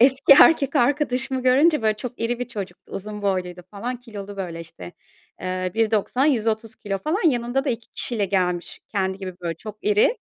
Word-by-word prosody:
eski 265 +3 +6
erkek 290 -5 +5
arkadaşımı 260 -1 +1
görünce, 275 +2 +4
böyle, 215 -1 +2
çok 245 +2 -7
iri 235 +1 -1
bir 250 - -4
çocuktu. 195 -6 -8
Uzun 210 +1 -6
boyluydu 180 -2 -2
falan, 240 +5 -4
kilolu, 205 -4 -9
böyle, 170 -3 -5
işte. 90 - -10 0.5
Eee, 185 0 -2
1.90, 225 +4 +1
130 225 -5 0
kilo 195 -1 -3
falan. 330 - +1
Yanında 245 +1 0
da 275 - 0
2 230 -1 -5
kişiyle 220 -5 0
gelmiş 180 -2 -1
kendi 190 -2 -1
gibi 185 -2 -6
böyle, 170 -1 -3
çok 210 +4 -9
iri. 210 - +3
220 Hz, 175 wpm, -23 LUFS, 195-250 Hz, 0.5 s, eski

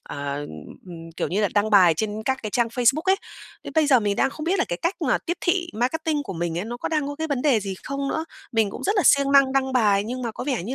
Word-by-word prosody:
ờ, 140 0 -5 0.5
ừ, 180 - -9 0.2
kiểu - - -2
như 195 +4 -1
là 205 - +2
đăng 210 +1 +2
bài 185 -5 +6
trên 215 +1 -3
các 265 0 0
cái 215 - -4
trang 235 +1 +1
Facebook 250 +6 +2
ấy. 380 0 +3 0.5
Đến - - -8
bây 315 -1 +3
giờ 265 -4 +5
mình 205 -2 -1
đang 270 - +2
không 305 - -7
biết 370 +4 +1
là - - +2
cái 175 - -3
cách 345 +4 +1
mà - - +2
tiếp 345 - -4
thị 350 0 +1
marketing 295 +6 -1
của 215 -8 -7
mình 170 -1 -3
ấy, 180 - -3
nó 235 +2 -5
có - - -4
đang 305 -3 0
có 285 - -4
cái 320 +1 -3
vấn 280 -5 -2
đề 265 -8 +3
gì 195 -1 -4
không 275 0 -3
nữa. 315 +3 -2 0.3
Mình 220 -3 +2
cũng - - -8
rất 410 +3 0
là 390 - +3
siêng 280 -1 +4
năng 275 -1 +5
đăng 265 -1 0
bài 205 -5 +3
nhưng 250 +3 -5
mà 235 - -2
có 250 - -6
vẻ 260 -8 -1
như 240 +9 -4
255 Hz, 295 wpm, -23 LUFS, 210-290 Hz, 0.5 s, bài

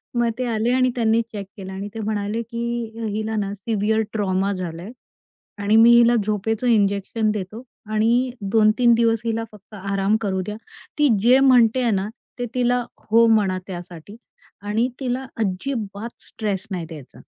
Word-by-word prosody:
मग 240 -1 +2
ते 255 - -2
आले 225 +1 0
आणि 255 0 +3
त्यांनी 230 -1 +2
चेक 215 -3 -7
केलं. 190 -1 -7
आणि 195 +2 -5
ते 225 - -6
म्हणाले, 215 +1 -2
की 235 0 -4 0.3
"हिला 220 0 -2
ना 200 -1 -2
सिव्हिअर 215 +1 0
ट्रॉमा 195 -2 0
झालाय. 180 +2 -6 0.7
आणि 205 +2 +2
मी 230 +1 +7
हिला 240 0 +5
झोपेचं 215 +3 -1
इंजेक्शन 210 0 +1
देतो. 210 +3 -5 0.3
आणि 235 +4 +2 0.2
2-3 225 +2 +4
दिवस 230 -1 +2
हिला 225 0 -1
फक्त 210 0 -18
आराम 195 +1 0
करू 190 -3 -1
द्या. 210 +1 -5 0.4
ती 295 - +5
जे 245 +4 +6
म्हणतेय 250 -2 +4
ना, 195 0 0 0.3
ते 245 - -1
तिला 245 0 +2 0.3
हो 230 +2 +6
म्हणा 205 -4 +3
त्यासाठी 175 +1 -9 0.5
आणि 215 +4 0
तिला 260 0 -2
अजिबात 215 +1 -3
स्ट्रेस 205 -2 -3
नाही 175 -3 -3
द्यायचा." 155 -5 -12
220 Hz, 155 wpm, -22 LUFS, 200-235 Hz, 0.7 s, मी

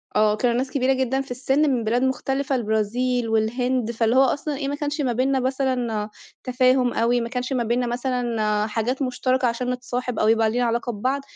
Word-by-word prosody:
آه 210 0 +3
كانوا 240 +1 +1
ناس 260 +1 -2
كبيرة 265 -1 +2
جدًا 265 0 0
في 270 -2 -10
السِّن 270 +4 +1
من 250 -4 0
بلاد 235 +4 +1
مختلِفة، 270 +1 -1
البرازيل 230 +2 0
والهند، 235 +2 0
فاللي 230 +1 +1
هو 265 - +6
أصلًا 285 +2 -1
إيه، 275 -1 -3
ما 285 - -2
كانش 295 +1 -3
ما 255 -4 0
بيننا 265 +3 +1
مثلًا 255 -5 -1 0.3
تفاهُم 255 0 +2
أوي، 235 +1 +2
ما 235 - -4
كانش 250 +1 -3
ما 245 - 0
بيننا 240 +2 0
مثلًا 235 -4 -1
حاجات 230 +5 -2
مشترَكة 255 0 0
عشان 240 +2 -2
نتصاحب 250 -1 -4
أو - - +2
يبقى 225 0 +3
لينا 245 +2 0
علاقة 235 +1 -1
ببعض، 260 +6 -1
250 Hz, 195 wpm, -23 LUFS, 230-260 Hz, 0.3 s, هو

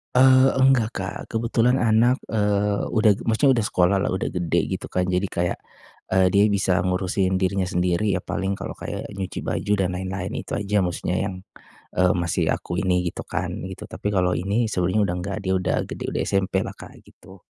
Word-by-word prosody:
Eee, 130 +1 +6
enggak 130 -5 +4
Kak, 95 +1 -4
kebetulan 115 +2 +1
anak, 120 0 +3 0.2
eee, 105 -1 +1
udah 110 -1 +5 0.2
maksudnya 135 +5 +4
udah 105 - -1
sekolah 90 +2 +2
lah, - - 0
udah 95 +5 -1
gede 90 -2 -1
gitu - - -4
kan, 90 - -1
jadi 90 +2 0
kayak, 85 0 -2 0.5
eee, 95 0 +4
dia 100 +1 +5
bisa 95 -3 +1
ngurusin 95 +1 0
dirinya 95 0 0
sendiri. 90 +3 +1
Ya 90 - -2
paling 95 0 -2
kalau - - -6
kayak, - - -6
nyuci 95 -2 -5
baju 105 - -1
dan 95 -2 0
lain-lain 95 +1 -4
itu - - -13
aja 105 0 0
maksudnya 90 +1 -2
yang, 95 - -5 0.6
eee, 90 0 +3
masih 85 -1 0
aku 85 - -3
ini, 90 -1 +1
gitu - - -6
kan, - - -3 0.2
gitu. - - -8
Tapi 105 - -5
kalau 90 -2 +1
ini, 105 +6 0
sebenarnya 90 +4 +1
udah 90 - -2
enggak, 95 +3 -4
dia 95 - 0
udah 90 - 0
gede, - - -7
udah - - -1
SMP 95 -1 0
lah - - -7
Kak, - - -13
gitu. 95 0 -16
95 Hz, 190 wpm, -23 LUFS, 90-105 Hz, 0.6 s, Eee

